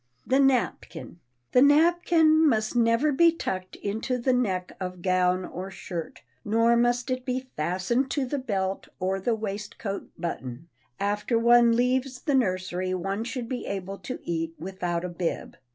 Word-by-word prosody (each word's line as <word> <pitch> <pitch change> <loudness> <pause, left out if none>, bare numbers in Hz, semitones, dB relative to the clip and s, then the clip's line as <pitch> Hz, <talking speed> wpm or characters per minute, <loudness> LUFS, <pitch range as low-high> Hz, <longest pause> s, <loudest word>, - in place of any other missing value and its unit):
[Sidenote: - - -12
THE 270 +1 +5 0.4
NAPKIN] - - -10 0.4
The 250 - +5
napkin 320 +1 +5
must 215 -2 0
never 235 +5 +3
be 335 +4 +5
tucked 185 - -4
into 220 +5 -2
the 250 +1 +1
neck 190 -8 0
of 180 -2 -6
gown 185 0 +2
or 185 +2 -6
shirt, 175 -3 -7 0.2
nor 230 +2 +3
must 240 +1 +1
it 255 0 -2
be 255 0 -4
fastened 185 - 0
to 280 -1 -1
the 280 +3 -2
belt 195 -6 -2
or 190 +1 -1
the 225 +4 0
waistcoat 205 -1 -5
button. 155 -3 -5 0.3
After 210 +3 0
one 235 0 +5
leaves 250 +1 0
the 290 - 0
nursery 185 -6 0
one 195 +4 -2
should 245 0 -4
be 250 +1 -4
able 195 0 -5
to 255 - -6
eat 165 -1 -3
without 175 0 -3
a - - -3
bib. 175 -1 -4
215 Hz, 160 wpm, -26 LUFS, 185-255 Hz, 0.4 s, THE